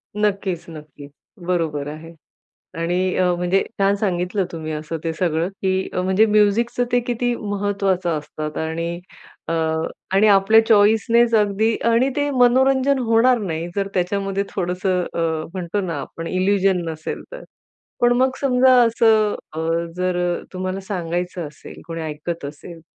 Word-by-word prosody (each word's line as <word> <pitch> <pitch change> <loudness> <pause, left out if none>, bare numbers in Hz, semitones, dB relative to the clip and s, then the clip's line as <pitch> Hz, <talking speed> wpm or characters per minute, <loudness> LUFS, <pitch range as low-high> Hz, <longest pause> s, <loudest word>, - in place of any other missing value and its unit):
नक्कीच, 200 -4 -1
नक्कीच. 150 -2 -11 0.4
बरोबर 160 -5 -1
आहे. 155 +2 -9 0.7
आणि 180 +2 0
अ, 185 - +2
म्हणजे 180 +2 +1 0.2
छान 195 0 +3
सांगितलं 185 -1 -1
तुम्ही 160 -2 -5
असं 155 +2 -4
ते 165 - -1
सगळं, 170 -1 0
की 190 -1 -2
म्हणजे 190 +4 +3
म्युझिकचं 215 +3 +2
ते 245 - +4
किती 245 0 -1
महत्त्वाचं 200 -4 -1
असतात. 150 +1 -7
आणि 165 +2 -3 0.5
अ, - - 0 0.6
आणि 200 +3 +5
आपल्या 205 +2 +6
चॉईसनेच 225 +2 +4
अगदी. 215 +1 +2 0.2
आणि 235 +3 +3
ते 290 0 +1
मनोरंजन 265 +1 +3
होणार 240 +1 +3
नाही 170 -5 -3
जर 195 -1 0
त्याच्यामध्ये 195 +2 -1
थोडंसं 180 0 -1
अ, - - -3 0.3
म्हणतो 185 +1 -3
ना 170 -6 -3
आपण 165 +4 -8
इल्युजन 185 0 +1
नसेल 160 -1 -5
तर. - - -8 0.6
पण 240 0 +4
मग 260 +2 +3
समजा 260 -1 +4
असं 225 -2 +3 0.2
अ, - - -5 0.4
जर 180 0 -1 0.3
तुम्हाला 185 +1 -3
सांगायचं 175 -2 -3
असेल, 145 - -13
कोणी 165 -1 -5
ऐकत 155 +1 -5
असेल. 155 +4 -9
190 Hz, 140 wpm, -21 LUFS, 170-220 Hz, 0.7 s, आपल्या